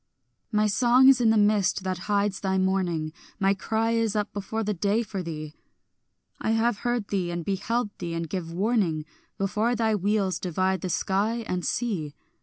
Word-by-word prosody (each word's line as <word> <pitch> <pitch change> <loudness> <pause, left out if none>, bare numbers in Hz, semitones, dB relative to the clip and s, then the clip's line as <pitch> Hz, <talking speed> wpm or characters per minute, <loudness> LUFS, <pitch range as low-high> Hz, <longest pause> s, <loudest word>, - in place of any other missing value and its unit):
My 215 -1 +3
song 245 +5 +5
is 260 -2 +5
in 230 - +4
the 220 - +4
mist 205 -2 +2
that 185 +1 -4
hides 200 -1 +1
thy 190 -1 0
morning, 180 -5 0 0.3
My 195 0 +3
cry 220 +3 -1
is 225 -2 +1
up 210 -1 -1
before 210 +2 -3
the 210 0 -1
day 205 +5 +1
for 200 -3 -5
thee; 155 -3 -6 0.9
I 220 - 0
have 225 -2 +1
heard 240 -4 -1
thee 185 -4 -1
and 170 -1 -4
beheld 210 +3 -1
thee 170 -2 -4
and 165 0 -3
give 170 -2 -4
warning, 180 -5 0 0.3
Before 210 +5 0
thy 225 -1 +1
wheels 200 -2 0
divide 185 +1 0
the 185 - -3
sky 215 +6 0
and 180 -1 -2
sea. 170 -13 -2
200 Hz, 180 wpm, -26 LUFS, 185-220 Hz, 0.9 s, song